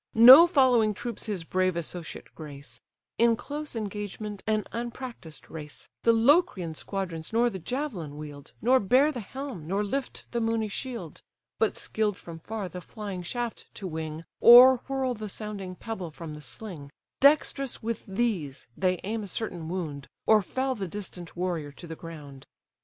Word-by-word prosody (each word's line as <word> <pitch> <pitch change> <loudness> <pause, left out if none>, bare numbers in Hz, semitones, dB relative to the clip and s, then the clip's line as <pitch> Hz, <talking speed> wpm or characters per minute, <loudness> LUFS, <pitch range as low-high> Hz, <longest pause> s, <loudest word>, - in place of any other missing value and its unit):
No 260 +9 +11
following 250 - +4
troops 235 +1 -5
his 200 -5 -2
brave 185 +1 +1
associate 170 0 -6
grace: 140 -6 -10 0.4
In 230 0 +5
close 295 +3 -6
engagement 210 -1 -5
an 215 -1 +1
unpractised 235 - -6
race, 150 -2 -9
The 230 - +5
Locrian 230 - +3
squadrons 170 -2 -4
nor 235 +2 +3
the 190 - -6
javelin 190 - -4
wield, 145 -2 -9
Nor 255 +3 +5
bear 255 +9 +4
the 255 - -5
helm, 240 - -7
nor 195 +4 0
lift 265 +6 -3
the 235 - -1
moony 225 -1 0
shield; 215 - -6 0.4
But 220 - +1
skill'd 210 -3 -1
from 165 -1 -10
far 210 +2 -5
the 180 0 -8
flying 200 -2 -6
shaft 240 +6 -4
to 200 - -7
wing, 160 -2 -5 0.2
Or 250 +2 +10
whirl 265 -2 0
the 215 -2 -6
sounding 200 -3 -6
pebble 195 -4 -5
from 160 0 -8
the 150 - -9
sling, 145 - -9 0.3
Dexterous 275 -3 +3
with 230 0 -3
these 190 - -2
they 185 -2 +1
aim 220 +3 -2
a 205 - -6
certain 175 -5 -4
wound, 155 -6 -4 0.2
Or 215 -1 +6
fell 260 +7 -1
the 200 -6 -4
distant 175 -3 -8
warrior 170 -5 -2
to 175 - -11
the 165 -1 -7
ground. 150 -5 -10
205 Hz, 165 wpm, -28 LUFS, 165-235 Hz, 0.4 s, No